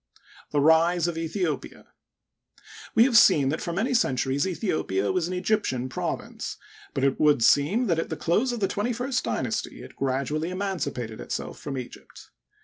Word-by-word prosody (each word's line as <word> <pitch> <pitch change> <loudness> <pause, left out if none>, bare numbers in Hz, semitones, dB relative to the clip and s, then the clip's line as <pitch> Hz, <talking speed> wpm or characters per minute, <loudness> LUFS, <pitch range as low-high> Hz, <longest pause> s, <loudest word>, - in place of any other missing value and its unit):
The 145 - 0
Rise 165 +3 +4
of 175 - -1
Aethiopia. 165 -2 -3 0.5
— - - -18
We 225 - +7
have 250 -1 +2
seen 160 -11 +6
that 155 - -2
for 170 - -3
many 220 +10 -1
centuries 135 - +1
Aethiopia 155 - -1
was 175 -2 0
an 185 - -3
Egyptian 180 - -1
province, - - -4 0.4
but 135 - -1
it 135 -1 +1
would 145 -5 +4
seem 165 - +4
that 170 -6 +1
at - - -3
the - - -4
close 220 +10 +1
of 240 -2 -4
the 195 - +3
twenty 215 +6 -1
first 250 +2 -1
dynasty - - -3
it - - -13
gradually 140 +5 -1
emancipated 150 - -3
itself - - -5
from 135 -2 -5
Egypt. 125 - -10
165 Hz, 170 wpm, -26 LUFS, 140-200 Hz, 0.5 s, We